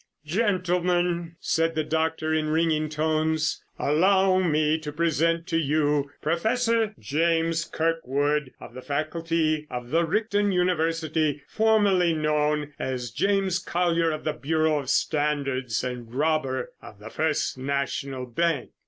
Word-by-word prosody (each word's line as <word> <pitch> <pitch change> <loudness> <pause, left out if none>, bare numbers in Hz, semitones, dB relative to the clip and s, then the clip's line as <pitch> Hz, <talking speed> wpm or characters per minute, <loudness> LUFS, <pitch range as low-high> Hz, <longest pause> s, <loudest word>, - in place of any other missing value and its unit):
"Gentlemen," 175 -2 0
said 165 0 0
the 155 - +1
doctor 160 0 -1
in 155 -1 0
ringing 155 -1 +1
tones, 155 0 0
"allow 190 +5 +3
me 155 -3 +2
to 150 -1 -6
present 165 +1 +1
to 165 -1 +1
you 145 -1 +1
Professor 225 +6 +1
James 165 +2 0
Kirkwood 150 -4 -1
of - - -11
the 130 - -8
faculty 155 +1 -1
of 125 -1 -6
the 165 +2 +3
Richton 205 +3 +1
University, 160 -4 0
formerly 205 -6 +3
known 150 -1 0
as 125 -3 -3
James 195 - +1
Collier 170 -2 +1
of 155 -1 -4
the 155 - -1
Bureau 155 +1 +1
of 135 -3 -6
Standards, 140 -6 0
and 125 -2 -5
robber 135 -2 -1
of 105 - -12
the 110 +3 -10
First 155 -4 -1
National 135 -1 -2
Bank." 145 +2 -1
160 Hz, 125 wpm, -25 LUFS, 150-170 Hz, -, allow